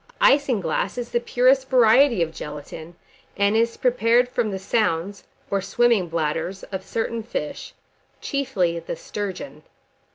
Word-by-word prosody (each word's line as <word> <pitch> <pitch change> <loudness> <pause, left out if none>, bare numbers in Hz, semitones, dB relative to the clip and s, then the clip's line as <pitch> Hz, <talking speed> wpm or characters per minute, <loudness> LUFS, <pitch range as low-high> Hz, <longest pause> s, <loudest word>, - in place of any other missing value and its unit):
Isinglass 265 - +2
is 240 -1 -5
the 240 - +1
purest 255 +2 +2
variety 245 -3 +5
of 160 -1 -5
gelatine, 155 +2 -8 0.4
and 200 +1 +2
is 230 +1 +1
prepared 245 0 +3
from 240 -3 -1
the 195 - -3
sounds 195 -1 -1 0.3
or 200 -1 +1
swimming 230 -1 +2
bladders 165 +3 -2
of 190 -1 -4
certain 230 +2 -3
fish, 365 - -6 0.4
chiefly 210 - -1
the 165 - -6
sturgeon. 205 +9 -6
215 Hz, 130 wpm, -23 LUFS, 175-245 Hz, 0.4 s, variety